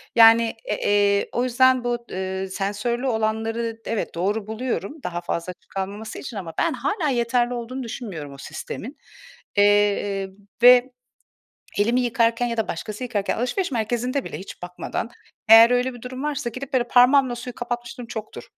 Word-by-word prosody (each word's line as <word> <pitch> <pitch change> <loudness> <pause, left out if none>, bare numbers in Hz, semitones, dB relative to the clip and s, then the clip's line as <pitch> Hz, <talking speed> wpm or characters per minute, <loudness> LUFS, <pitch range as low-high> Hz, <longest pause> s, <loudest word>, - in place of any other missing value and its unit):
Yani, 230 0 +7
e 210 - -1
eee, 205 0 +2
o 245 - 0
yüzden 255 0 +3
bu, 240 -1 -2
ııı, 190 0 -3
sensörlü 210 +7 -2
olanları 225 0 -1
d - - -4
evet, 225 -6 -3
doğru 200 +4 -1
buluyorum, 230 +3 -3
daha 175 0 -3
fazla 175 +1 -3
açık - - -35
kalmaması 200 +3 -5
için. 240 -6 -7
Ama 165 -4 -6
ben - - +1
hâlâ 300 - -1
yeterli 240 0 +1
olduğunu 245 +2 -5
düşünmüyorum 200 - -6
o 140 - -12
sistemin, 180 - -7 0.6
eee, 205 -1 +3 0.3
ve 250 +1 +8 0.9
elimi 235 +4 +3
yıkarken 235 -1 +1
ya 230 -1 -3
da 225 - 0
başkası 210 +7 -5
yıkarken 210 -5 -1
alışveriş 280 - -1
merkezinde 245 +3 -1
bile - - -6
hiç 190 - -10
bakmadan, 180 +5 -4 0.4
eğer 225 +2 +9
öyle 250 +1 +1
bir 240 - -12
durum 255 +2 -6
varsa 285 -5 -2
gidip 255 +3 -8
böyle 240 -2 +2
parmağımla 250 +1 +5
suyu 245 +1 -7
kapatmışlığım 240 0 -5
çoktur. 220 -2 -7
230 Hz, 160 wpm, -23 LUFS, 205-250 Hz, 0.9 s, eğer